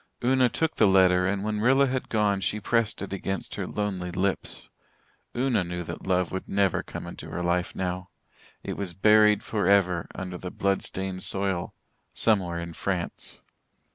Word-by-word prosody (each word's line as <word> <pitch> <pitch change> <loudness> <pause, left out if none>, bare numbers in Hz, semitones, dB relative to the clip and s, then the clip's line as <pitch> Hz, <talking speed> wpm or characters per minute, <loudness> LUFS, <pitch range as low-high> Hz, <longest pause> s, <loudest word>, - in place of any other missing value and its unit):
Una 130 0 +4
took 160 +6 -1
the 110 - +5
letter 90 -1 +5
and 100 +1 -1
when 105 0 -1
Rilla 135 +5 +4
had 130 -1 -2
gone 105 -3 +1
she 105 - -1
pressed 110 0 0
it 100 - -6
against 95 0 -3
her - - -4
lonely 95 -4 -3
lips. 95 +2 -2 0.7
Una 125 -6 +2
knew 90 0 -4
that 85 +2 -8
love 90 -2 +1
would 95 - -5
never 100 -2 +2
come - - -8
into - - -8
her 90 - -4
life 85 0 0
now 90 0 -3 0.5
it - - -4
was 90 -4 -4
buried 105 +2 +5
for 105 -2 -1
ever 90 -4 +3
under 90 -2 -5
the 90 - -5
blood 100 +1 0
stained 95 -1 -5
soil 95 -3 -1 0.4
"Somewhere 95 -6 +2
in 85 0 -5
France." 90 0 -4
95 Hz, 170 wpm, -26 LUFS, 90-105 Hz, 0.7 s, the